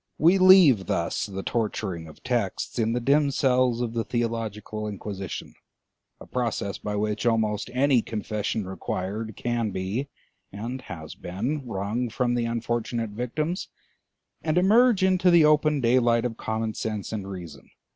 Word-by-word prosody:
We 175 Hz, +5 st, +5 dB
leave 180 Hz, -, +7 dB
thus 85 Hz, +4 st, -1 dB
the 95 Hz, -1 st, -5 dB
torturing 100 Hz, -7 st, -2 dB
of 75 Hz, -, -15 dB
texts 120 Hz, -3 st, -2 dB
in 115 Hz, 0 st, +1 dB
the 120 Hz, -, 0 dB
dim 140 Hz, +4 st, +3 dB
cells 125 Hz, -3 st, +2 dB
of 115 Hz, -2 st, -2 dB
the 115 Hz, -1 st, 0 dB
theological 110 Hz, -3 st, -3 dB
Inquisition, 100 Hz, -2 st, -6 dB, 0.7 s
a -, -, -11 dB
process 115 Hz, -5 st, -2 dB
by 105 Hz, 0 st, -3 dB
which 105 Hz, +2 st, -1 dB
almost 110 Hz, -2 st, +1 dB
any 130 Hz, 0 st, +3 dB
confession 105 Hz, -1 st, -3 dB
required 95 Hz, +3 st, -4 dB
can 120 Hz, -2 st, -1 dB
be 100 Hz, +9 st, -3 dB, 0.4 s
and 115 Hz, +6 st, -5 dB
has 80 Hz, -9 st, -8 dB
been 125 Hz, +10 st, -4 dB
wrung 110 Hz, +4 st, -2 dB
from 120 Hz, +2 st, 0 dB
the 120 Hz, -1 st, 0 dB
unfortunate 115 Hz, -1 st, -2 dB
victims, 150 Hz, -, -3 dB, 0.7 s
and 155 Hz, +1 st, 0 dB
emerge 215 Hz, +3 st, +5 dB
into 185 Hz, -1 st, +4 dB
the 170 Hz, -3 st, +6 dB
open 150 Hz, -1 st, +3 dB
daylight 120 Hz, -1 st, +3 dB
of 115 Hz, -2 st, -2 dB
common 110 Hz, 0 st, -2 dB
sense 110 Hz, -1 st, -4 dB
and 100 Hz, -3 st, -4 dB
reason. 85 Hz, -7 st, -9 dB
115 Hz, 145 wpm, -26 LUFS, 105-130 Hz, 0.7 s, leave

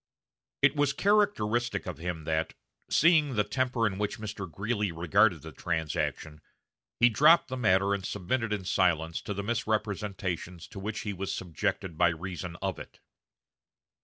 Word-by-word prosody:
It 135 Hz, +1 st, +5 dB
was 145 Hz, -1 st, +2 dB
characteristic 120 Hz, -, +1 dB
of 90 Hz, -5 st, -6 dB
him 85 Hz, -1 st, -4 dB
that, 80 Hz, +1 st, -1 dB, 0.3 s
seeing 155 Hz, -4 st, +4 dB
the 105 Hz, -, +3 dB
temper 125 Hz, +2 st, 0 dB
in 100 Hz, -2 st, -1 dB
which 105 Hz, -1 st, -2 dB
Mr. 105 Hz, -4 st, -6 dB
Greeley 105 Hz, +3 st, -1 dB
regarded 85 Hz, -1 st, +2 dB
the -, -, -8 dB
transaction, 80 Hz, -1 st, -3 dB, 0.6 s
he 120 Hz, -, +7 dB
dropped 150 Hz, +8 st, +5 dB
the 130 Hz, -, -3 dB
matter 100 Hz, -5 st, +3 dB
and 100 Hz, -1 st, -2 dB
submitted 105 Hz, +5 st, -2 dB
in 100 Hz, -3 st, -2 dB
silence 85 Hz, -3 st, +1 dB
to 105 Hz, -, -5 dB
the 100 Hz, -, -3 dB
misrepresentations 100 Hz, -5 st, -2 dB
to 100 Hz, -, -8 dB
which 105 Hz, +3 st, -4 dB
he 105 Hz, -, -3 dB
was 95 Hz, +1 st, -4 dB
subjected 85 Hz, -1 st, -3 dB
by 90 Hz, -, +6 dB
reason 90 Hz, +1 st, -5 dB
of 95 Hz, -2 st, -2 dB
it. -, -, -11 dB
100 Hz, 155 wpm, -29 LUFS, 90-115 Hz, 0.6 s, he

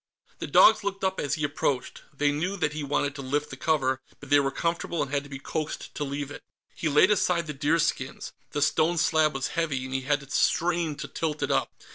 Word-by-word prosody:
The -, -, -4 dB
dogs 220 Hz, -1 st, +6 dB
looked 195 Hz, -1 st, -3 dB
up 190 Hz, 0 st, 0 dB
as 145 Hz, -, 0 dB
he 155 Hz, -, -4 dB
approached. 145 Hz, -2 st, -1 dB
They 145 Hz, 0 st, +1 dB
knew 175 Hz, +7 st, -2 dB
that 150 Hz, -4 st, 0 dB
he 155 Hz, -, -4 dB
wanted 145 Hz, 0 st, 0 dB
to 140 Hz, -, -7 dB
lift 145 Hz, +3 st, -2 dB
the -, -, -6 dB
cover, 130 Hz, -3 st, 0 dB, 0.2 s
but 145 Hz, -1 st, -12 dB
they 145 Hz, -, +7 dB
were 135 Hz, -1 st, +1 dB
comfortable 170 Hz, +3 st, -2 dB
and 135 Hz, -, -7 dB
had 145 Hz, -1 st, +1 dB
to -, -, -12 dB
be 135 Hz, -, -6 dB
coaxed 155 Hz, +3 st, -4 dB
to 150 Hz, -, -3 dB
leave 145 Hz, 0 st, -4 dB
it. -, -, -8 dB, 0.3 s
He 160 Hz, -, -2 dB
laid 150 Hz, +7 st, +5 dB
aside 180 Hz, -4 st, +2 dB
the 150 Hz, -, -5 dB
deerskins. 150 Hz, -1 st, -1 dB, 0.2 s
The 145 Hz, -, 0 dB
stone 160 Hz, +3 st, +2 dB
slab 155 Hz, -2 st, +3 dB
was 135 Hz, -1 st, -1 dB
heavy, 155 Hz, -6 st, -1 dB
and 130 Hz, -, -6 dB
he 135 Hz, -, 0 dB
had 145 Hz, +2 st, 0 dB
to 140 Hz, -, -14 dB
strain 170 Hz, -2 st, +1 dB
to 145 Hz, -, -6 dB
tilt 155 Hz, -2 st, -3 dB
it -, -, 0 dB
up. -, -, +1 dB
150 Hz, 235 wpm, -27 LUFS, 140-165 Hz, 0.3 s, they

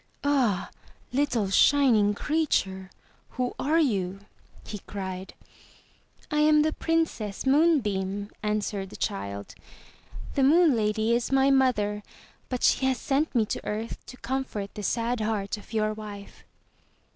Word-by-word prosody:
"Ah, 245 Hz, -10 st, +1 dB, 0.4 s
little 250 Hz, -8 st, +1 dB
shining 225 Hz, -5 st, +4 dB
creature, 195 Hz, -11 st, 0 dB, 0.5 s
who 250 Hz, -1 st, -1 dB
are 310 Hz, +4 st, +2 dB
you?" 195 Hz, -, 0 dB, 0.4 s
he 210 Hz, -, -6 dB
cried. 190 Hz, -2 st, -6 dB, 1.0 s
"I 300 Hz, -, +1 dB
am 300 Hz, 0 st, +5 dB
the 310 Hz, 0 st, 0 dB
Princess 320 Hz, -, -1 dB
Moonbeam," 210 Hz, -, +2 dB
answered 210 Hz, -2 st, -2 dB
the -, -, -11 dB
child. 100 Hz, +1 st, -4 dB, 0.8 s
"The 275 Hz, -, +1 dB
Moon 310 Hz, +1 st, +5 dB
Lady 220 Hz, +1 st, +1 dB
is 240 Hz, +2 st, 0 dB
my 270 Hz, 0 st, +4 dB
mother, 210 Hz, -6 st, +2 dB, 0.5 s
but 250 Hz, -2 st, -3 dB
she 265 Hz, -, +3 dB
has 260 Hz, -1 st, +1 dB
sent 285 Hz, +1 st, -1 dB
me 225 Hz, -3 st, +3 dB
to -, -, -4 dB
earth 220 Hz, +2 st, -4 dB
to 255 Hz, -, -10 dB
comfort 255 Hz, -7 st, -4 dB
the 210 Hz, -, -6 dB
sad 235 Hz, +4 st, -1 dB
heart 210 Hz, -2 st, -1 dB
of 210 Hz, -, -14 dB
your 215 Hz, -1 st, 0 dB
wife." 210 Hz, -2 st, -10 dB
225 Hz, 135 wpm, -27 LUFS, 205-270 Hz, 1.0 s, am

